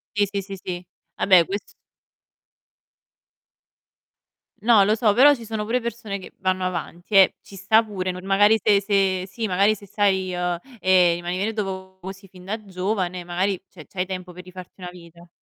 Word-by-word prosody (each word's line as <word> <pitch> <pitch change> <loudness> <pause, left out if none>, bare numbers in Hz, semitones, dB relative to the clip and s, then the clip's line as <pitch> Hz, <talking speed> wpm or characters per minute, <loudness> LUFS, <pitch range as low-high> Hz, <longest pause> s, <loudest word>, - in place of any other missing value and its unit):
Sì, 205 0 +3
sì, 200 -1 -2
sì, 195 0 -8
sì. 180 -1 -5 0.3
Vabbè 185 -3 +5
ques 200 +3 -6 2.9
No, 225 -3 +5
lo 215 - +2
so, 215 -2 +2
però 285 +5 +6
ci 235 - -11
sono 215 -1 -4
pure 240 +4 0
persone 235 -4 -5
che 190 - -12
vanno 185 0 0
avanti, 175 +1 -5
eh. 195 -2 +6
Ci 200 - -14
sta 220 +4 +3
pure, 195 -4 -4
nor 180 0 -5
magari 205 +3 +4
se 200 -1 +4
se 195 -2 +1
sì, 225 +4 -4
magari 200 +3 +2
se 200 -1 -14
sai, 190 -2 0
uhm, 180 0 -1 0.2
ehm, 185 -3 +4
rimanere 180 +5 -3
do 190 -2 -5
vo 190 +2 -6
sin 195 +1 -15
fin 185 -1 -16
da 215 +4 -3
giovane, 185 -1 -3
magari, 180 +2 -1
cioè 160 -5 -14
c'hai 185 -1 -4
tempo 185 -1 -6
per 180 +1 -11
rifarti 185 +1 -12
una 180 - -6
vita. 170 -1 -15
190 Hz, 180 wpm, -23 LUFS, 180-205 Hz, 2.9 s, però